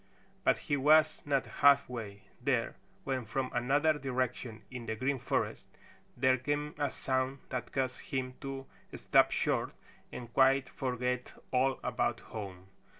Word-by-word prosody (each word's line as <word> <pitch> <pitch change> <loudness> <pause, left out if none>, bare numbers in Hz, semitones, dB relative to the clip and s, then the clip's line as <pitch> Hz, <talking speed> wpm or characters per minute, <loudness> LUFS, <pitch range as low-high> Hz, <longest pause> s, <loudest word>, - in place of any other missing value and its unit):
But - - +4
he 145 - -1
was 155 +3 +5
not 140 -2 +2 0.2
halfway 125 -8 +3 0.2
there 125 -3 0 0.3
when 130 -2 -1
from 130 +4 -2
another 140 +6 +3
direction 125 -3 -2
in 125 -2 -7
the 110 - -1
Green 130 +4 0
Forest - - -1 0.5
there 130 0 +3
came 145 +3 -2
a 145 -1 +1
sound 130 +1 -1
that 125 -2 -4
caused 130 -1 -1
him 130 -2 -3
to 135 -1 -5 0.3
stop - - +4
short - - 0 0.4
and 120 -1 -8
quite 135 0 +4
forget 125 -1 -2 0.2
all 130 +1 +2
about - - 0
home. 95 -4 -8
130 Hz, 140 wpm, -32 LUFS, 125-135 Hz, 0.5 s, was